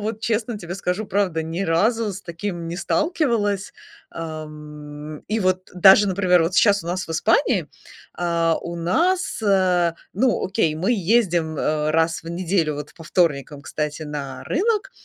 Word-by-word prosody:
вот 220 +1 -4
честно 225 0 -1
тебе 175 -1 -6
скажу, 195 +2 -2
правда, 185 -5 0
ни 165 +4 -3
разу 210 +5 +1
с 195 - -8
таким 170 0 -5
не 170 - -4
сталкивалась. 210 - 0 0.4
Ам, 150 -2 -8
и 220 +2 0
вот 185 -1 0
даже, 195 +3 +7
например, 180 -2 +3
вот 165 +3 -1
щас 200 +1 +4
у - - -8
нас 185 +1 -2
в - - -10
Испании, 185 - +2 0.5
а, 170 -2 +1
у 170 0 -5
нас, 340 - 0
э, 185 -4 +3 0.2
ну, 240 +4 +1
окей, 185 -5 +1
мы 185 +9 0
ездим, 175 -7 +1
э, 150 0 0
раз 165 +1 +1
в - - -7
неделю, 170 -3 0
вот, 150 0 -7
по 165 - -12
вторникам, 150 -4 0
кстати, 150 0 -4
на 140 -4 -6
рынок. 400 - 0
180 Hz, 160 wpm, -22 LUFS, 160-205 Hz, 0.5 s, даже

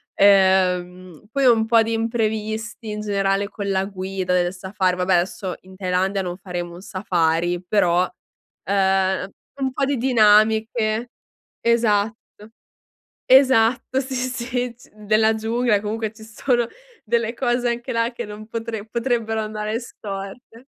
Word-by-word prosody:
Ehm, 185 -3 +3
poi 275 -1 +1
un 225 -3 +5
po' 225 -1 +5
di 225 +1 -2
imprevisti 220 0 -2
in 210 0 -4
generale 200 -1 0
con 200 -2 -5
la 190 0 +1
guida 190 -1 -3
del 175 0 +1
safari 185 0 -1
vabbè, 180 +1 +1
adesso 180 +1 -1
in 190 0 -15
Thailandia 190 +1 0
non 175 0 -5
faremo 175 -3 -5
un 180 - -11
safari, 175 -2 0
però, 180 -2 +2 0.6
ehm, 190 0 +1 0.3
un 265 -1 0
po' 275 - 0
di 280 0 0
dinamiche. 220 -1 +3 0.5
Esatto, 225 -2 +2 1.1
esatto, 260 -1 +4
sì, 265 0 -7
sì, 250 -1 -2
g 240 - -20
della 215 +1 +2
giungla 225 -1 +1
comunque 220 +1 -3
ci 220 0 -14
sono 240 +2 0 0.4
delle 230 +1 0
cose 245 0 0
anche 235 0 -3
là 230 +1 +1
che 240 - -5
non 210 +1 -9
potre 225 -1 -5
potrebbero 230 -2 -1
andare 215 +1 -3
storte. 220 +3 -9
215 Hz, 135 wpm, -22 LUFS, 190-230 Hz, 1.1 s, un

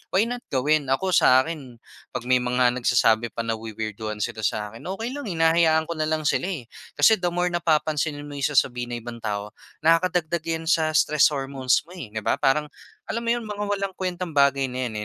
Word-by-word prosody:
why 195 - +5
not 245 +1 -3
gawin? 145 +2 +1
Ako 185 +8 0
sa 130 -6 +5
akin, 145 -7 -7 0.4
'pag - - -3
may 125 0 +3
mga 125 0 +2
nagsasabi 120 -2 +2
pa 115 - -2
nawi-weirduhan 110 -1 -4
sila 120 -2 -4
sa 105 -1 -4
akin, 115 - -11 0.2
okey 230 +4 -4
lang, 285 -3 -6
hinahayaan 165 -2 +3
ko - - 0
na 155 - 0
lang 155 -1 -1
sila, 170 +4 +1 0.2
eh. 120 - -29 0.2
Kasi 220 -3 +5
the 180 - 0
more 175 +1 0
napapansinin 155 -3 0
mo 145 - -9
'yong 145 +2 -1
sasabihin 120 -1 +1
ng - - -4
ibang 115 0 -7
tao 105 -1 -4 0.3
nakakadagdag 165 0 +2
'yan 165 0 -2
sa 160 -3 +3
stress 150 -1 +4
hormones 135 -2 0
mo, 180 - -11
eh, 115 -10 -8
'di 110 - -3
ba? - - 0
Parang 150 +2 +1 0.4
alam 230 +1 -2
mo - - 0
'yon 240 0 +1
mga 210 -1 -4
walang 195 -1 -2
kuwentang 180 -3 -4
bagay 140 -1 +3
na 130 0 -3
'yan, 110 - -5
150 Hz, 205 wpm, -24 LUFS, 120-170 Hz, 0.4 s, why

